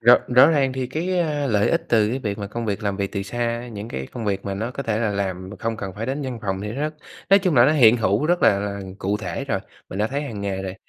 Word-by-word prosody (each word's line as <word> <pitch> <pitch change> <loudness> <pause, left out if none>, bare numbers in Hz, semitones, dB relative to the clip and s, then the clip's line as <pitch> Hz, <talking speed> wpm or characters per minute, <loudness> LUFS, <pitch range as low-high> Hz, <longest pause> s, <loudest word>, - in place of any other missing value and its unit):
Rõ 120 +2 +8
rõ 125 +1 +7
ràng 140 -4 +2
thì 130 -1 -2
cái, 175 +7 -1
a, 150 -4 0
lợi 105 -5 +2
ích 165 - +1
từ 110 -3 +4
cái 125 +4 -1
việc 105 -5 -3
mà 100 - -4
công 115 +3 -5
việc 105 +1 -2
làm 100 -2 -1
việc 100 -1 -2
từ 100 - -2
xa, 120 +3 -3
những 105 -1 -7
cái 65 - -5
công 115 -3 -5
việc 100 -1 -1
mà 100 - -3
nó 110 +5 -3
có 140 - -5
thể 110 -4 -1
là 110 -2 0
làm 95 -2 -3
mà 105 - -9
không 115 +2 -2
cần 95 -4 -5
phải 110 +5 -4
đến 140 +3 -2
văn 130 -3 -4
phòng 95 -2 -2
thì 105 +1 -4
nó 145 +5 -2 0.4
nói 195 - +8
chung 185 -4 +1
là 120 -2 +7
nó 145 - +4
hiện 120 -6 +6
hữu 110 +3 +1
rất 175 +2 +1
là 100 - +5
là 100 0 -3 0.2
cụ 100 +2 0
thể 90 -5 -4
rồi, - - -1 0.3
mình 95 - -6
đã 105 - +2
thấy 140 +4 -3
hằng 115 -8 -6
ngày 95 -1 -2
rồi. 95 0 -5
110 Hz, 305 wpm, -23 LUFS, 100-130 Hz, 0.4 s, Rõ